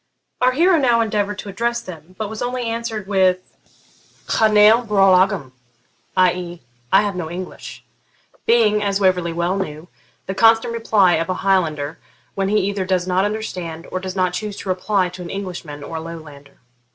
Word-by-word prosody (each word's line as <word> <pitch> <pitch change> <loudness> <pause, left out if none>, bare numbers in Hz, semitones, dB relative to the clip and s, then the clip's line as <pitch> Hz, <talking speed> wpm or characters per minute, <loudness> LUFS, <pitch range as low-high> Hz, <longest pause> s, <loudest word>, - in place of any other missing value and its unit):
Our 255 0 +4
hero 340 +4 +4
now 240 -4 +3
endeavoured 205 -2 -1
to 205 - -7
address 235 +4 -1
them, 180 -3 -11
but 215 - -3
was 220 +1 -7
only 245 0 -2
answered 230 -2 -3
with 185 -2 +1 0.7
'Cha 220 - +3
n'eil 215 +2 +6
Beurl 195 -4 +4
agam' 180 -8 +1 0.7
i.e. 180 -2 +1 0.3
'I 195 - +6
have 205 -2 -2
no 170 -3 -4
English,' 180 +2 -8 0.6
being, 220 -3 +4
as 200 -1 0
Waverley 180 -3 +2
well 175 +3 -1
knew, 165 -3 -5 0.4
the 190 - -3
constant 225 +3 +4
reply 215 -5 +3
of 165 +2 -2
a 185 - 0
Highlander 160 -6 0 0.3
when 195 0 -1
he 210 - +2
either 200 0 -1
does 185 -1 0
not 185 +1 +1
understand 180 -6 -5
or 185 - -2
does 185 0 -6
not 185 -1 +1
choose 205 +2 -4
to 195 - -7
reply 185 +1 +1
to 180 +1 -10
an 175 - -7
Englishman 175 -7 -6
or 160 +3 -5
Lowlander. 155 -4 -11
190 Hz, 175 wpm, -20 LUFS, 180-215 Hz, 0.7 s, n'eil